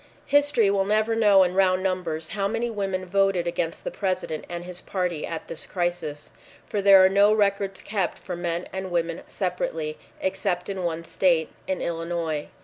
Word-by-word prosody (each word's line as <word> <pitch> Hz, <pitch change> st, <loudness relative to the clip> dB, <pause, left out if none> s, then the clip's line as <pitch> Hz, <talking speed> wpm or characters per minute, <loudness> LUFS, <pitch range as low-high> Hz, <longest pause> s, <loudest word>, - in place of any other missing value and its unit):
History 285 Hz, -7 st, +3 dB
will 195 Hz, -1 st, +2 dB
never 215 Hz, +2 st, +2 dB
know 205 Hz, -4 st, +6 dB
in 180 Hz, 0 st, 0 dB
round 185 Hz, -1 st, +3 dB
numbers 170 Hz, -4 st, -2 dB
how 195 Hz, -1 st, -1 dB
many 230 Hz, +3 st, -1 dB
women 195 Hz, -3 st, -2 dB
voted 195 Hz, -1 st, +2 dB
against 170 Hz, -1 st, -2 dB
the -, -, -3 dB
President 185 Hz, -5 st, -2 dB
and 175 Hz, 0 st, -5 dB
his 180 Hz, 0 st, -6 dB
party 180 Hz, -5 st, -2 dB
at 165 Hz, -1 st, -5 dB
this 165 Hz, -, -6 dB
crisis, 175 Hz, -5 st, -3 dB, 0.3 s
for 205 Hz, -, -2 dB
there 195 Hz, -1 st, +8 dB
are -, -, +8 dB
no 200 Hz, +2 st, +5 dB
records 200 Hz, -2 st, +1 dB
kept 195 Hz, -3 st, -1 dB
for 180 Hz, -, -6 dB
men 175 Hz, 0 st, -3 dB
and 190 Hz, 0 st, -4 dB
women 170 Hz, -1 st, -1 dB
separately, 165 Hz, -5 st, -3 dB, 0.2 s
except 185 Hz, -1 st, -1 dB
in 190 Hz, -2 st, -3 dB
one 165 Hz, -1 st, -2 dB
state, 165 Hz, -2 st, +2 dB, 0.2 s
in 190 Hz, -1 st, -2 dB
Illinois. 165 Hz, -2 st, -2 dB
185 Hz, 175 wpm, -25 LUFS, 170-195 Hz, 0.3 s, there